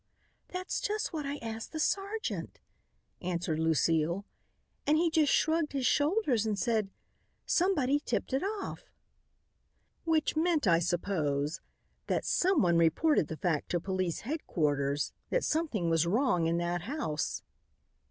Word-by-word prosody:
"That's 365 0 -3
just 425 -2 -2
what 300 -3 -3
I 285 +1 -3
asked 225 +3 -6
the 315 - -3
sergeant," 400 +6 -2 0.6
answered 170 -3 -2
Lucile, 165 +3 +1 0.6
"and 300 +1 +4
he 335 0 +2
just 310 -3 +3
shrugged 320 -2 +2
his 270 -2 -1
shoulders 290 - +2
and 215 -2 -1
said, 220 -3 0 0.6
'Somebody 290 -7 +2
tipped 290 - -3
it 265 - +2
off.'" 405 +1 -4 1.1
"Which 320 -2 +1
meant, 320 -2 +2
I 170 -3 +5
suppose, 160 -5 -1 0.5
that - - 0
someone 200 - +3
reported 170 - +3
the 160 - -6
fact 165 -5 -1
to 175 - +1
police 185 -1 -2
headquarters 145 - -1 0.2
that - - +1
something 300 - 0
was 165 0 +2
wrong 200 -5 +2
in 165 +1 +1
that 175 0 -1
house." 205 - -3
225 Hz, 135 wpm, -31 LUFS, -, 1.1 s, I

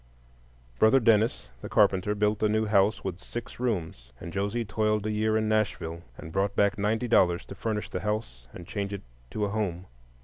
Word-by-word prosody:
Brother 110 +5 +6
Dennis, 110 - +2
the - - -7
carpenter, 100 0 +3
built 105 0 +1
a 110 - +3
new 110 +1 +1
house 105 0 +2
with 95 -2 -4
six 120 +3 -8
rooms; 80 - -3 0.2
Josie 100 +5 -1
toiled 105 0 0
a 110 - 0
year 110 +1 +1
in 110 0 0
Nashville, 100 -6 -1 0.2
and 80 - -9
brought 100 +2 0
back 100 -1 +3
ninety 110 +4 0
dollars 90 -6 +3
to - - -9
furnish 110 -2 -3
the - - -2
house 95 - -4
and 85 - -10
change 100 +2 -4
it 100 - -6 0.3
to 105 - -1
a - - -2
home. 95 -4 -2
105 Hz, 190 wpm, -28 LUFS, 95-110 Hz, 0.3 s, Brother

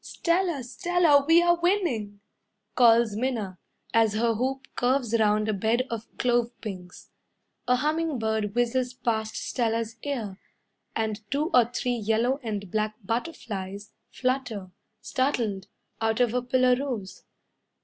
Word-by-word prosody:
"Stella, 340 -5 0
Stella, 320 +2 +3
we 335 +1 +6
are 345 0 +3
winning," 300 - 0 0.5
calls 230 -2 +5
Minna, 215 -6 -2 0.3
As 225 -2 +4
her 230 +1 +2
hoop 260 +3 -2
curves 250 -2 +1
round 215 0 +2
a 215 - +1
bed 225 +5 +1
of 225 -1 -4
clove 240 -2 +2
pinks. 185 -5 -9 0.6
A 250 - +4
humming 305 +2 0
bird 220 -2 -1
whizzes 245 +1 0
past 220 -3 -2
Stella's 230 -1 -1
ear, 225 -9 -4 0.6
And 220 -1 -1
two 300 +5 0
or 245 -2 +6
three 245 +1 -2
yellow 230 +5 +1
and 205 -6 -4
black 215 0 -1
butterflies 205 - -4 0.2
Flutter, 250 -7 -2 0.3
startled, 230 -8 -1 0.3
out 225 +1 +1
of 240 -2 +2
a 250 - +1
pillar 250 0 +3
rose. 225 -9 -5
235 Hz, 130 wpm, -26 LUFS, 215-260 Hz, 0.6 s, we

